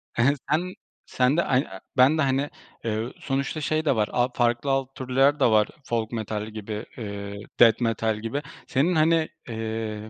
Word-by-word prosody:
He 120 - +2
he, 140 +3 +4
sen 180 +5 0 0.3
sen 130 +5 +2
de 170 - +3
ay 130 +2 +2 0.3
ben 135 +5 +6
de, - - +2
hani, 135 +1 +1 0.4
eee, 110 +2 -2
sonuçta 140 +3 -2
şey 155 +3 0
de 135 - +3
var, 105 -1 +1
al 125 +1 +2
farklı 120 +2 +1
alt 135 0 -1
türler 135 +3 +2
de - - +4
var 110 -2 +4 0.2
folk 115 -2 -1
metal 110 -2 -3
gibi, 110 -1 -6 0.7
death 115 0 +6
metal 110 -2 0
gibi. 115 +6 -3 0.3
Senin, 160 +7 +2
hani, 160 0 +3 0.2
eee, 110 -1 -4
125 Hz, 170 wpm, -25 LUFS, 110-140 Hz, 0.7 s, ben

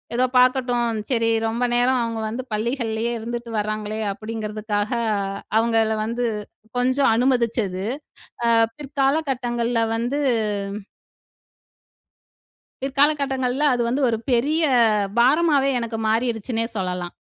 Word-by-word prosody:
ஏதோ 255 - +3
பார்க்கட்டும், 250 -2 +3 0.2
சரி 230 -2 +2 0.2
ரொம்ப 230 +2 -2
நேரம் 250 +1 +3
அவுங்க 230 -1 -3
வந்து 245 +4 -4
பள்ளிகள்லேயே 230 0 -1
இருந்துட்டு 235 +1 -5
வர்றாங்களே!" 215 0 -3
அப்பிடிங்கிறதுக்காக 215 0 -3 0.7
அவுங்கள 225 -1 +2
வந்து 235 +2 -2 0.5
கொஞ்சம் 255 0 +3
அனுமதிச்சது, 230 -6 0 0.6
அ - - +3 0.3
பிற்கால 285 +1 0
கட்டங்கள்ல 240 -2 -1
வந்து 245 +5 -1 2.6
பிற்காலகட்டங்கள்ல 275 -1 +1
அது 245 - 0
வந்து 260 +4 0
ஒரு 225 - 0
பெரிய 295 +7 +2 0.6
பாரமாவே 280 +2 +4
எனக்கு 230 -1 -4
மாறிருச்சுன்னே 230 0 0
சொல்லலாம். 180 -2 -3
240 Hz, 95 wpm, -22 LUFS, 225-260 Hz, 2.6 s, பாரமாவே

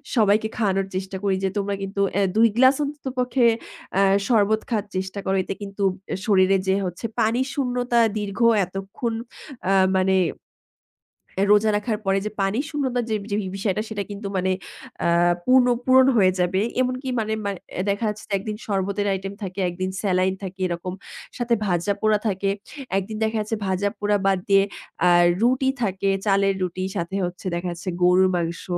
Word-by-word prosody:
সবাইকে 215 -1 +3
খাওয়ানোর 195 -3 +1
চেষ্টা 190 0 -3
করি 195 -1 +2
যে, 190 - +2
"তোমরা 200 0 -1
কিন্তু 195 +1 -5
অ্যা 200 - +2
২ 225 +1 +6
গ্লাস 260 +2 +6
অন্ততপক্ষে 260 -3 -1 0.5
আ - - +5 0.3
শরবত 220 -2 +3
খাওয়ার 215 -4 0
চেষ্টা 190 +1 -3
করো। 190 0 +1
এতে 195 - -4
কিন্তু 200 0 -5 0.4
শরীরে 195 -3 +4
যে 190 - +3
হচ্ছে 180 +5 -5 0.2
পানি 225 +3 +2
শূন্যতা, 245 -3 0 0.2
দীর্ঘ 205 -1 -4 0.3
এতক্ষণ 195 +5 -4 0.6
আ - - +3 0.2
মানে 190 0 +3 1.4
রোজা 210 +1 +5
রাখার 215 0 -2
পরে 195 0 +2
যে 215 - -3
পানি 195 +5 0
শূন্যতার 260 -5 -1
যে 215 - +1
ব্যা 205 0 -3 0.2
বিষয়টা, 200 +1 -1
সেটা 205 -2 -3
কিন্তু 200 0 -6
মানে 185 +1 +1 0.5
অ্যা 170 +1 +3
পূর্ণ 255 -1 +5 0.2
পূরণ 260 0 +6
হয়ে 185 -3 +5
যাবে।" 180 +2 +1 0.2
এমনকি 255 +1 -2
মানে 220 0 -1
মানে 200 -3 -3 0.3
দেখা 200 +3 0
যাচ্ছে 210 0 -6
যে - - -4
১ - - -6
দিন 210 -1 -3
শরবতের 200 0 -1
আইটেম 195 +1 -4
থাকে, 185 +1 -5
১ - - -6
দিন 185 - 0
স্যালাইন 185 -2 +1
থাকে, 190 0 -7
এরকম। 175 +1 -4 0.4
সাথে 240 -1 0
ভাজাপোড়া 200 +4 +1
থাকে। 195 0 0 0.5
১ 195 - 0
দিন 215 - -5
দেখা 220 0 0
যাচ্ছে 215 +1 -2
ভাজাপোড়া 205 +2 0
বাদ 195 -1 +3
দিয়ে 195 0 +6 0.4
আ - - +6 0.3
রুটি 255 +3 +3
থাকে। 195 -1 0 0.2
চালের 195 -1 +3
রুটি 185 0 -2
সাথে 170 +3 -3
হচ্ছে 175 +2 -7
দেখা 175 +1 -3
যাচ্ছে 175 +2 -6
গরুর 180 +1 +5
মাংস, 170 -1 -2
200 Hz, 170 wpm, -23 LUFS, 190-220 Hz, 1.4 s, ২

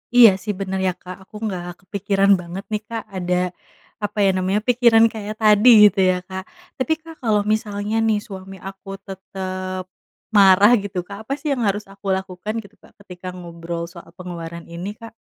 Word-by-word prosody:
Iya, 235 -3 +10
sih, 210 - -2
bener 190 -1 -2
ya, - - +2
Kak, 185 0 -8
aku 210 - -19
nggak 185 -4 -3 0.2
kepikiran 195 +1 +1
banget 180 +2 -7
nih, 210 0 -1
Kak, 225 -2 -4
ada, 180 -1 -1 0.7
apa 205 - -3
ya 195 - +5
namanya, 190 +3 +1
pikiran 235 -2 +6
kayak 215 -1 -5
tadi 215 +3 +6 0.2
gitu 195 0 -5
ya, - - 0
Kak. 190 0 -5 0.3
Tapi, 295 +5 +1
Kak, 325 0 -12
kalau 210 -2 +3
misalnya 210 0 -2
nih, 215 -1 +2
suami 195 -1 -9
aku 195 +1 -10 0.2
tetap 185 -1 -5 0.5
marah, 200 +2 +7
gitu, 195 -2 -6
Kak, 200 -1 -8
apa 275 - -2
sih 295 +1 -3
yang 250 - -3
harus 205 +1 0
aku 195 +1 -18
lakukan, 190 +2 -6
gitu, 200 +1 -18
Kak, - - -19
ketika 185 -2 -10
ngobrol 170 -1 -6
soal 170 -1 -13
pengeluaran 170 -2 -7
ini, 175 +4 -5
Kak? 230 -1 -10
195 Hz, 180 wpm, -21 LUFS, 185-215 Hz, 0.7 s, Iya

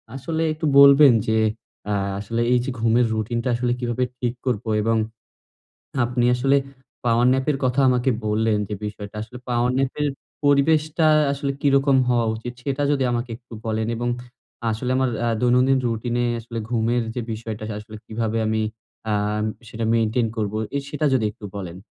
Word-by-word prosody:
আসলে 160 +5 -3
একটু 155 +1 -4
বলবেন 140 -1 +8
যে, 110 0 +2 0.5
আ - - +2 0.3
আসলে 115 +3 -2
এই 125 - +4
যে, - - -3
ঘুমের 115 +2 +3
রুটিনটা 115 +3 -2
আসলে 120 +1 0
কিভাবে 120 0 -1 0.2
ঠিক 120 -1 -1
করব? 120 -4 0 0.2
এবং 115 +1 +1 1.1
আপনি 120 0 0
আসলে 135 +3 +3 0.5
পাওয়ার 120 0 +3
ন্যাপ 130 0 0
এর 140 - 0
কথা 125 +2 +2
আমাকে 125 +1 +2 0.2
বললেন, 110 0 +1
যে, 105 - -3
বিষয়টা 105 0 -7
আসলে 115 +3 -9
পাওয়ার 120 0 +1
ন্যাপ 135 -1 +1
এর 150 - +2 0.4
পরিবেশটা 155 +3 +3 0.3
আসলে 140 0 -2
কিরকম 140 -1 +3
হওয়া 120 -2 +2
উচিত? 115 +2 -6
সেটা 140 +1 -2
যদি 135 -2 +1
আমাকে 120 0 -2
একটু 120 +1 -22
বলেন, 110 0 -1
এবং 120 +1 -2 0.6
আসলে 110 +3 -2
আমার 130 -1 +1 0.2
আ - - +2
দৈনন্দিন 125 +2 +4
রুটিনে 120 +1 -1 0.2
আসলে 115 0 -7
ঘুমের 120 0 +1
যে, 125 - -2
বিষয়টা 110 -1 -6 0.2
আসলে 105 +1 -10
কিভাবে 115 0 -2
আমি 110 0 0 0.5
আ - - +2 0.6
সেটা 115 0 -4
মেইনটেইন 115 +1 +1
করব, 105 -2 -1 0.2
এ - - +2
সেটা 150 +1 -1
যদি 125 -4 +2
একটু 105 0 -15
বলেন? 90 -3 -6
120 Hz, 165 wpm, -23 LUFS, 110-130 Hz, 1.1 s, বলবেন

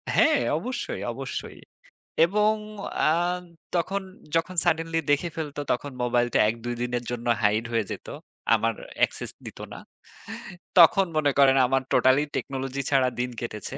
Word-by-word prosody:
হ্যাঁ, 310 -3 +5 0.2
অবশ্যই, 255 - -4
অবশ্যই। - - -6 0.7
এবং 210 +4 +2 0.6
আ - - +4 0.6
তখন 195 +4 0 0.3
যখন 165 +3 0
suddenly 165 -1 +1
দেখে 145 +4 +1
ফেলত 155 -3 -5
তখন 140 +3 -2
মোবাইলটা 120 -1 +1
১ 110 - -2
২ 120 0 -2
দিনের 120 0 -2
জন্য 120 0 -4
হাইড 105 +2 +2
হয়ে 115 -2 +1
যেত। - - -7 0.5
আমার - - +2 0.3
Access - - -8
দিত - - -9
না। - - -8 1.0
তখন 190 +3 +7
মনে 145 -2 +3
করেন 135 -1 +6
আমার 135 +1 +2
Totally 130 +3 +4
Technology 135 0 -3
ছাড়া 130 -2 +4
দিন 125 0 0
কেটেছে। 120 +3 -6
140 Hz, 140 wpm, -26 LUFS, 120-165 Hz, 1.0 s, তখন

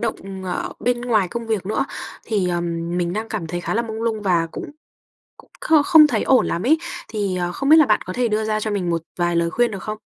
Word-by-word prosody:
động, 225 -2 -1 0.3
ờ, 180 - -3
bên 245 0 0
ngoài 220 -7 +1
công 235 -1 -5
việc 215 -4 -2
nữa. 220 +6 0 0.4
Thì, 200 -5 0
ờm, 170 0 -2
mình 175 0 -1
đang 220 +2 -3
cảm 200 -7 -4
thấy 175 +2 -4
khá - - -3
là 230 - +1
mông 225 -1 -5
lung 220 -2 -1
và 175 -4 +2
cũng 325 - -7 0.7
cũng - - -19
kh 310 -3 +4
không 315 -4 +8
thấy 245 -7 0
ổn 260 -1 +4
lắm 170 - -2
ấy. 315 +3 +4 0.3
Thì, 200 -4 -2
ờ, 175 0 -2
không 275 +7 -3
biết 315 - +8
là 310 -4 +6
bạn - - +3
có 185 - -4
thể 245 +3 0
đưa 215 0 0
ra 215 0 -1
cho 215 - -2
mình 190 -4 -1
một 165 -1 -1 0.2
vài 175 0 +1
lời 170 0 +1
khuyên 240 -1 +1
được 195 -3 -6
không? 215 0 -5
215 Hz, 260 wpm, -21 LUFS, 175-235 Hz, 0.7 s, không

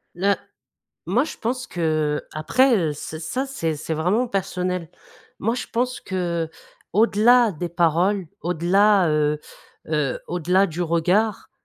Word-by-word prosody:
Là 200 +3 +2 0.7
moi 235 - +2
je - - -7
pense 250 +2 -3
que, 175 - -7 0.4
heu, - - -27
après, 250 - +3
heu, 165 -6 0
ce 155 +2 -7
ça, 255 - -3
c'est 165 - -2
c'est 160 +2 -4
vraiment 185 +11 +1
personnel. 180 -4 -2 0.5
Moi, 225 +3 0
je 245 - -4
pense 250 +2 -1
que, 170 -3 -2 0.4
au-delà 225 +2 +4
des 175 +1 -4
paroles, 175 +3 +1
au-delà, 180 +3 +3
heu 150 0 +1 0.5
heu, 150 -4 0
au-delà 180 +3 +2
du 175 -1 -6
regard, 180 +6 +1
180 Hz, 140 wpm, -23 LUFS, 165-215 Hz, 0.7 s, au-delà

